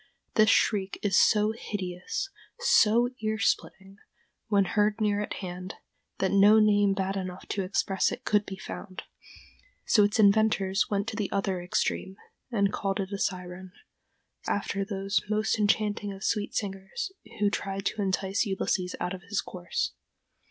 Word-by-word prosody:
This 215 0 +5
shriek 195 -4 +2
is 200 -2 +1
so 210 0 +4
hideous, 195 - -4 0.3
so 240 - +4
ear 215 0 -1
splitting, 195 -2 -2 0.5
when 200 -3 +3
heard 210 +3 +1
near 205 -1 +1
at 210 - -4
hand, 180 +1 -6 0.4
that 190 - 0
no 200 +2 +6
name 205 -2 +4
bad 195 0 -1
enough 185 -1 -5
to 200 - -1
express 190 0 0
it - - -7
could 210 -1 +3
be 190 -1 -7
found; 190 0 -8 0.8
so 210 - +5
its 205 +1 +1
inventors 205 -2 +3
went 200 +1 -1
to 230 - -6
the 205 -2 -2
other 195 -2 -1
extreme, 190 +2 -2 0.3
and 200 -3 +1
called 195 0 -1
it 195 +1 -3
a 200 - -3
siren, 180 0 -4 0.7
after 200 0 -1
those 195 0 -1
most 215 +1 +1
enchanting 210 -1 +1
of 195 +1 -9
sweet 210 -2 -1
singers 205 - -4 0.3
who 205 -1 +2
tried 195 0 -3
to 215 - -1
entice 195 0 0
Ulysses 190 -3 -1
out 180 +1 -2
of 190 - -7
his 200 +1 -3
course. 175 -2 -3
200 Hz, 155 wpm, -28 LUFS, 190-210 Hz, 0.8 s, no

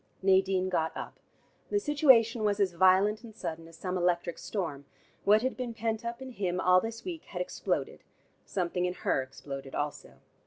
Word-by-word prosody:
Nadine 190 -1 +3
got 160 -3 -1
up. - - -7 0.5
The 410 - +2
situation 260 - +4
was 205 -1 +1
as 190 -3 +2
violent 190 +4 +4
and 225 -2 -11
sudden 165 0 -5
as 165 0 -15
some 185 +1 -2
electric 175 -1 0
storm. 160 -9 -4 0.4
What 215 +3 +5
had 260 - 0
been 245 -3 -4
pent 225 +1 -2
up 235 +2 -5
in 260 - -8
him 185 -6 -2
all 185 0 +5
this 225 +2 -6
week, 340 -4 -5
had - - -7
exploded: - - -2 0.4
something 180 -1 -1
in 180 0 -2
her 135 - 0
exploded 135 +1 -8
also. 145 0 -4
190 Hz, 180 wpm, -30 LUFS, 175-230 Hz, 0.5 s, What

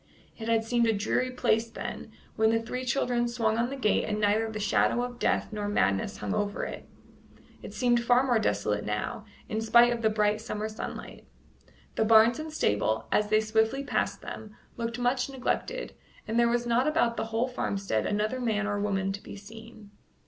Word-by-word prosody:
It 225 - -7
had 225 -1 +2
seemed 235 +1 +1
a 225 - +3
dreary 220 +5 0
place 230 -2 +1
then, 225 - -7 0.2
when 220 0 +3
the 225 0 +2
three 250 +3 -5
children 245 -1 +1
swung 230 -2 0
on 240 +1 +1
the 275 - -4
gate 215 -6 +1
and 210 0 -2
neither 215 +2 +2
the 215 -1 -5
shadow 225 +3 +2
of 245 -1 -6
death - - 0
nor 210 -1 -3
madness 100 - +1
hung 105 -2 -3
over 205 0 -1
it; - - -8 0.7
it - - -8
seemed 240 -1 +2
far 245 +2 +4
more 245 -4 +2
desolate 105 - 0
now, 105 - -3 0.2
in 220 +1 -2
spite 235 +2 +5
of 235 - -4
the 220 - +3
bright 210 0 +1
summer 215 -2 -4
sunlight. 215 - -8 0.7
The - - +3
barns 225 +2 +5
and 310 0 -5
stable, 110 - 0
as 210 - +2
they 215 +1 +3
swiftly 220 +5 +1
passed - - -1
them, 215 -1 -8 0.2
looked 235 0 -3
much 250 +2 0
neglected, 275 - -3 0.3
and 225 +2 0
there 235 0 +4
was 240 0 0
not 240 +3 +2
about 300 -7 +2
the - - -2
whole 225 +2 -1
farmstead 195 - -2
another 215 +5 -1
man 220 -4 0
or 205 -1 -1
woman 195 -2 0
to 200 +1 -6
be - - -10
seen. 220 0 -12
225 Hz, 195 wpm, -28 LUFS, 210-240 Hz, 0.7 s, spite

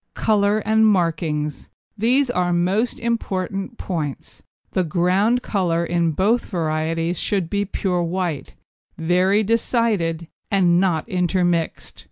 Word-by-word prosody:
COLOUR 210 0 +2
AND 220 +1 +4
MARKINGS 160 -6 -1 0.3
These 245 +5 +2
are 180 -5 0
most 185 +7 0
important 195 -2 -3
points. 155 -7 -5 0.3
The 185 - +1
ground 185 +8 +1
colour 170 -4 0
in 170 -1 0
both 210 +9 +1
varieties 165 0 -1
should 190 -5 -1
be 205 0 0
pure 185 -2 -1
white, 170 -3 -3 0.4
very 185 +5 +2
decided, 210 -7 0 0.2
and 180 -3 +3
not 175 -5 0
intermixed. 175 -2 -1
180 Hz, 115 wpm, -21 LUFS, 170-205 Hz, 0.4 s, AND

